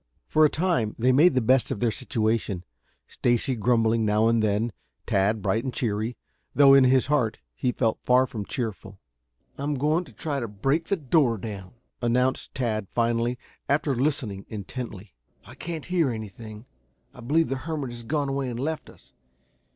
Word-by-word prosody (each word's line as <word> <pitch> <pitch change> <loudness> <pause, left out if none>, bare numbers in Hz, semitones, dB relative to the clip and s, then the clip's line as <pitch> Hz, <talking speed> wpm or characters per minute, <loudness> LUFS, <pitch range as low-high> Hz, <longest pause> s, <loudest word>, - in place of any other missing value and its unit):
For 155 - +3
a 150 - +6
time 155 - 0
they 125 +3 +3
made 145 +4 +5
the 130 - +3
best 130 +2 +3
of 130 - -3
their 120 -2 +1
situation, 110 -6 -1 0.4
Stacy 120 +2 0
grumbling 115 -1 +2
now 105 +1 +3
and 115 -1 +2
then, 110 +2 +1 0.3
Tad 100 +2 +1
bright 110 +3 +1
and 130 - -2
cheery, 115 -1 -2 0.4
though 140 -1 +7
in 135 -1 +7
his 130 0 +4
heart 130 -6 +1 0.2
he 125 - -1
felt 115 -2 0
far 125 +1 +4
from 110 -5 -5
cheerful. 110 -5 -5 0.6
"I'm 145 +1 -1
going 150 +6 +1
to - - -15
try 145 -4 -3
to 120 - -3
break 135 +11 0
the 200 - +1
door 135 -5 +2
down," 100 -1 -8 0.3
announced 125 +4 0
Tad 110 -6 -2
finally, 120 +1 0 0.3
after 145 0 +2
listening 120 -7 -1
intently. 105 -1 -7 0.3
"I - - -12
can't 165 -3 -6
hear 175 -5 +1
anything. 110 0 -7 0.5
I - - -15
believe 155 +7 +1
the 135 - -1
hermit 145 -2 -4
has 120 0 -8
gone 145 +3 -1
away 135 -1 -2
and 120 -1 -5
left 155 +4 -3
us. - - -18
120 Hz, 175 wpm, -26 LUFS, 110-140 Hz, 0.6 s, though